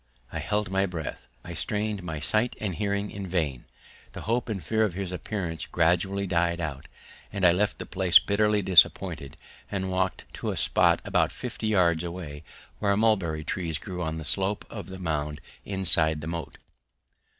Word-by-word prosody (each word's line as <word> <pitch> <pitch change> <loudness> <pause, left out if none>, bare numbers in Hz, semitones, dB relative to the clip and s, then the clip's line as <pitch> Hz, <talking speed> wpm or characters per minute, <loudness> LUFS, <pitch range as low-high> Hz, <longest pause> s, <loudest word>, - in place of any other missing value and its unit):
I 80 - -4
held 105 +4 -2
my 95 0 +1
breath, 80 -8 -6 0.2
I 85 - -8
strained 105 +6 -2
my 80 -4 -5
sight 110 - 0
and 100 -4 -3
hearing 100 +3 -2
in 100 -1 -6
vain, 80 -9 -2 0.5
the - - -7
hope 120 +2 -1
and 100 -5 -4
fear 110 0 +1
of 100 -5 -1
his 95 -2 -4
appearance 90 -2 -4
gradually 90 +4 +1
died 85 -1 0
out, 75 -5 -5 0.4
and 100 -2 -1
I 85 - +7
left 100 +4 0
the - - -7
place 95 -2 +4
bitterly 105 0 +1
disappointed 85 -6 +3 0.3
and 95 -2 -3
walked 95 0 -1
to - - -4
a - - -3
spot - - +3
about - - +1
fifty 115 -3 -5
yards 90 -6 +2
away, 85 -4 -7 0.4
where 100 -1 +1
mulberry 95 -8 +1
trees 80 -1 -3
grew 90 +1 -7
on 80 -1 -3
the 80 - -6
slope 100 +4 0
of 105 -3 -7
the 95 - -8
mound 75 -4 -3 0.3
inside 85 -5 +7
the - - -6
moat. 85 0 -6
90 Hz, 175 wpm, -26 LUFS, 80-100 Hz, 0.5 s, I